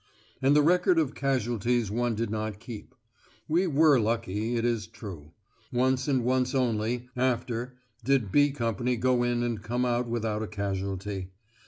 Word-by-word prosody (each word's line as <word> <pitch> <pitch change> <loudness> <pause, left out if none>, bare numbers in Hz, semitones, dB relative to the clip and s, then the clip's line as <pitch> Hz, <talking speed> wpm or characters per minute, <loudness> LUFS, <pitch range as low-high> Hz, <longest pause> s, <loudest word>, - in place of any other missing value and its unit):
And 135 +2 +4
the 150 - +5
record 180 +2 +4
of 150 -4 +1
casualties 120 -4 0
one 120 +1 0
did 115 -1 -2
not 110 -2 -3
keep. 110 -1 -9 0.5
We 175 +4 +2
were 150 -3 +5
lucky, 110 0 -1
it 115 0 0
is 115 -5 0
true. 90 -9 -10 0.4
Once, 130 +2 +1
and 130 -4 +2
once 125 +1 +1
only, 120 0 0
after, 125 -1 -1 0.3
did 125 -5 +1
"B" 145 0 +5
Company 120 -2 -1
go 125 +1 +2
in 120 0 +1
and 120 -3 -2
come 120 +3 -1
out 120 0 0
without 110 -2 -2
a 110 - -3
casualty. 100 -2 -3
120 Hz, 160 wpm, -28 LUFS, 110-130 Hz, 0.5 s, the